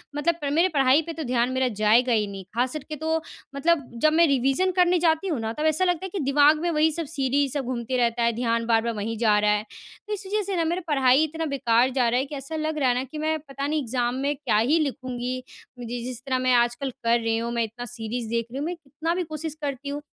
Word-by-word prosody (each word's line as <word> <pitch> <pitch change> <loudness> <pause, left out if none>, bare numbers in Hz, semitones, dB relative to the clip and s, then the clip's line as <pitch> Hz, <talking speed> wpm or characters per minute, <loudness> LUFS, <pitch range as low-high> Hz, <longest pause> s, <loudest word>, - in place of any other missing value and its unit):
मतलब 330 +3 +1 0.2
मेरे 340 +4 +3
पढ़ाई 275 -1 +4
पे 330 +1 -6
तो 320 - -5
ध्यान 245 -1 +1
मेरा 260 0 +1
जाएगा 230 +3 +3
ही 215 -2 +2
नहीं। 195 -1 -7
खास 250 +1 +1
करके 305 0 -6
तो 320 +2 -1 0.4
मतलब 295 -2 +1
जब 310 - +5
मैं 335 +1 +5
रिविज़न 275 +7 +2
करने 360 -1 +3
जाती 325 +2 +2
हूँ 310 -8 -1
ना, 225 0 -3
तब 305 +4 -3
ऐसा 315 +4 +2
लगता 355 0 0
है - - -5
कि 395 - -2
दिमाग 290 +3 +4
में 345 - 0
वही 315 +1 +3
सब 330 +1 -3
सीरीज़ 275 -2 0
सब 280 -4 -2
घूमते 250 0 -2
रहता 235 -1 +1
है, 235 - +3
ध्यान 230 -1 0
बार-बार 230 0 +1
वहीं 220 +2 -4
जा 215 -2 +3
रहा 210 0 +3
है। 210 0 +1 0.4
तो 425 - -3
इस 405 -1 -5
वजह 425 +2 0
से 390 -1 -3
ना 335 - +1
मेरा 345 +3 -1
पढ़ाई 265 +1 +4
इतना 320 +1 -3
बेकार 255 -4 +2
जा 250 -2 +2
रहा 245 - +2
है 265 - -1
कि 290 - -8
ऐसा 275 +3 -6
लग 310 0 -2
रहा 265 -3 +2
है 245 - +2
ना 250 - -1
कि 270 +4 -9
मैं 315 +1 0
पता 280 -1 -5
नहीं 305 0 0
एग्जाम 245 0 -1
में 280 +2 -1
क्या 270 -6 0
ही 265 +10 +3
लिखूँगी। 255 -3 -3 0.4
जि 240 0 -5
जिस 250 -1 -5
तरह 260 -1 0
मैं 255 0 +2
आजकल 240 +3 +1
कर 235 +1 +3
रही 225 -1 0
हूँ, 235 +1 -3
मैं 235 -1 +1
इतना 230 +2 -6
सीरीज़ 230 0 -5
देख 230 0 -1
रही 260 - -6
हूँ। 295 - -2
मैं 355 - -3
कितना 315 +1 -4
भी 365 - -1
कोशिश 310 -1 -5
करती 280 -1 -4
हूँ 290 +1 -4
270 Hz, 260 wpm, -25 LUFS, 240-315 Hz, 0.4 s, जब